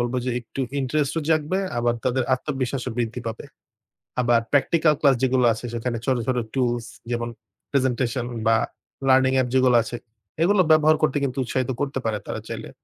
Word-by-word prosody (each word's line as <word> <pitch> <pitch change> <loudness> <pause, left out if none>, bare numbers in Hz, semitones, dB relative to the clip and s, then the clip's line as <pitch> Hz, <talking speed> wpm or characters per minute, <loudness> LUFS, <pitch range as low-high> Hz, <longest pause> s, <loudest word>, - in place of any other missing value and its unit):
বলবো 120 +1 -1
যে 125 - -1
একটু 120 +3 -7 0.2
ইন্টারেস্টও 150 +4 0
জাগবে 155 +4 +1 0.2
আবার 120 0 +1
তাদের 130 0 +1
আত্মবিশ্বাসও 130 -2 -3
বৃদ্ধি 120 +1 -2
পাবে। 115 0 -5 0.8
আবার 120 -1 +3
প্র্যাকটিক্যাল 155 +2 +3
ক্লাস 140 -3 +5
যেগুলো 130 -1 +3
আছে 115 +2 -7
সেখানে 120 0 -2
ছোট, 130 -2 +2
ছোট 130 -1 +1 0.2
টুলস 120 -3 0 0.3
যেমন 120 0 -1 0.4
প্রেজেন্টেশন 130 -2 0 0.2
বা 115 - +5 0.5
লার্নিং 130 0 +5
অ্যাপ 130 -1 +2
যেগুলো 130 -1 +4
আছে 120 - -5 0.5
এগুলো 195 +1 +4
ব্যবহার 155 0 +6
করতে 150 -2 +2
কিন্তু 135 0 -2
উৎসাহিত 130 +1 -2
করতে 135 -1 -1
পারে 110 -2 0
তারা - - -3
চাইলে - - -6
130 Hz, 165 wpm, -24 LUFS, 120-140 Hz, 0.8 s, ব্যবহার